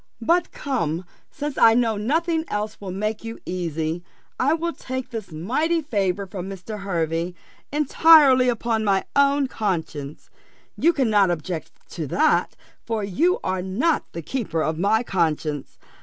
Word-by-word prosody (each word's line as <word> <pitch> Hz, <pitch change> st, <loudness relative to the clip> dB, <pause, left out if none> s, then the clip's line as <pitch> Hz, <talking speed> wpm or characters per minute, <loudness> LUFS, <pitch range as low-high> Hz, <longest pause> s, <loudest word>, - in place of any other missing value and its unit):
But 340 Hz, +7 st, +2 dB
come, 180 Hz, -, -2 dB, 0.2 s
since 295 Hz, -2 st, -4 dB
I 225 Hz, 0 st, +7 dB
know 230 Hz, -2 st, +2 dB
nothing 320 Hz, +9 st, 0 dB
else 210 Hz, +1 st, -4 dB
will 195 Hz, -, -6 dB
make 215 Hz, +4 st, -3 dB
you 225 Hz, 0 st, -6 dB
easy, 165 Hz, -1 st, -3 dB, 0.4 s
I 280 Hz, +5 st, +3 dB
will 335 Hz, +1 st, -2 dB
take 260 Hz, 0 st, -6 dB
this 220 Hz, -6 st, -6 dB
mighty 300 Hz, -, 0 dB
favour 200 Hz, -, -1 dB
from 185 Hz, 0 st, -6 dB
Mr. 195 Hz, +3 st, -7 dB
Hervey 170 Hz, -2 st, -2 dB, 0.4 s
entirely 290 Hz, -3 st, +6 dB
upon 230 Hz, -1 st, 0 dB
my 195 Hz, -2 st, +2 dB
own 280 Hz, 0 st, +4 dB
conscience: 160 Hz, -, -4 dB, 0.4 s
you 335 Hz, -, +4 dB
cannot 220 Hz, -, +3 dB
object 165 Hz, -1 st, -3 dB, 0.2 s
to 160 Hz, -4 st, -4 dB
that, 310 Hz, -, +2 dB, 0.3 s
for 225 Hz, -2 st, -2 dB
you 315 Hz, -, +1 dB
are 185 Hz, 0 st, -1 dB
not 225 Hz, -, 0 dB
the 170 Hz, -, -6 dB
keeper 165 Hz, -, -2 dB
of 160 Hz, 0 st, -2 dB
my 215 Hz, +5 st, +2 dB
conscience. 155 Hz, -, -1 dB
210 Hz, 145 wpm, -23 LUFS, 175-270 Hz, 0.4 s, I